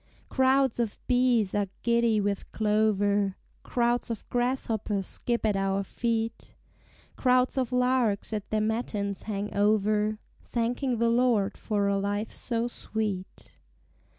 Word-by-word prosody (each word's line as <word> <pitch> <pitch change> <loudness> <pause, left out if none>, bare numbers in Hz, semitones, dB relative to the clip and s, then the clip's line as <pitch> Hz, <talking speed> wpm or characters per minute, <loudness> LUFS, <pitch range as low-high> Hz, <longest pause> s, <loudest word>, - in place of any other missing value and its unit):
Crowds 265 -1 +3
of 230 -3 -1
bees 245 -5 +2
are 205 -1 +1 0.2
giddy 235 -2 +3
with 200 -1 -2
clover, 205 -2 +1 0.2
Crowds 240 0 0
of 230 -3 -5
grasshoppers 225 -5 -1
skip 235 +3 -2
at 210 -2 +2
our 195 0 0
feet: 230 +1 -3 0.6
Crowds 255 0 +2
of 255 -2 -1
larks 250 -5 +1
at 210 -1 -4
their 215 0 +1
matins 210 -3 -2
hang 210 -1 -3
over, 210 +1 +2 0.3
Thanking 245 +2 -1
the 230 +1 +2
Lord 230 -5 +2
for 205 -2 -1
a 200 0 +1
life 205 +2 -2
so 235 -1 -2
sweet. 210 - -4
220 Hz, 125 wpm, -28 LUFS, 205-240 Hz, 0.6 s, Crowds